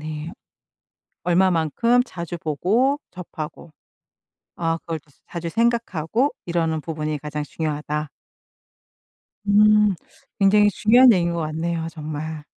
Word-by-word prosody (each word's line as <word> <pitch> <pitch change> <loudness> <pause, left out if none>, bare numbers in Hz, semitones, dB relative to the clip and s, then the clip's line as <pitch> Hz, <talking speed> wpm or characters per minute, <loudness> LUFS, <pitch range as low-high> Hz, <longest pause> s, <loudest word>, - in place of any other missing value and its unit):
네. 155 +1 -6 0.9
얼마만큼 185 +7 +2
자주 175 -5 -6
보고 215 - +1
접하고 165 -3 -8 0.8
아 165 -1 -1
그걸 165 -1 -5
또 145 0 -29 0.2
자주 170 -1 -5
생각하고 230 - 0 0.2
이러는 165 -2 0
부분이 155 -1 -3
가장 150 0 -5
중요하다. 150 0 -3 1.4
음. 210 0 +5 0.4
굉장히 205 +1 +5
중요한 240 +5 +6
얘기인 170 -3 +1
것 170 - -2
같네요 160 +1 -2
정말. 155 -1 -6
170 Hz, 240 characters per minute, -22 LUFS, 155-205 Hz, 1.4 s, 중요한